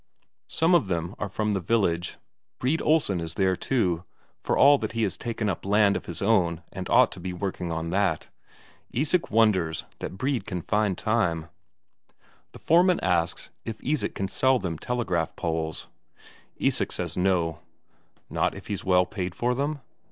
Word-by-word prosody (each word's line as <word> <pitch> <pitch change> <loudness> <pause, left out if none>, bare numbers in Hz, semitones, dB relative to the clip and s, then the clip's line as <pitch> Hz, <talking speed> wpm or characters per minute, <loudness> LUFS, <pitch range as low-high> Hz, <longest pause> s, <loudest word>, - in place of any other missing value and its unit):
Some 165 +3 +2
of 165 - +4
them 85 0 -2
are 105 - -3
from 105 +1 -1
the 100 - +1
village, 90 -3 0 0.4
Brede 140 +6 0
Olsen 150 - +2
is 80 -1 -5
there 95 -1 +2
too, 90 -8 0 0.4
for - - 0
all 140 0 +7
that 110 0 -4
he 115 -1 0
has 100 - 0
taken 115 -2 -3
up 95 - -2
land 100 0 +3
of - - -4
his 85 +2 -4
own 90 -6 +2
and - - -5
ought - - +5
to - - -7
be 90 +1 -4
working 90 -2 -3
on 80 0 -3
that. 95 -4 0 0.6
Isak 155 +7 0
wonders 100 -8 +2
that 95 - -6
Brede 130 -2 -1
can 90 -3 -4
find 105 -3 +1
time. 90 -8 0 1.0
The - - -12
foreman 175 +2 +4
asks 85 -1 0
if 110 -1 -6
Isak 150 +1 -1
can 95 - -2
sell 130 +6 +3
them 85 -8 -4
telegraph 95 -10 -1
poles. 80 -1 -2 0.7
Isak - - +1
says - - -3
no. 90 -4 +1 0.7
Not - - 0
if - - -10
he's 100 -3 -3
well 90 -1 +4
paid 90 -3 -4
for 120 +1 +1
them? 145 +3 -2
100 Hz, 170 wpm, -26 LUFS, 85-115 Hz, 1.0 s, all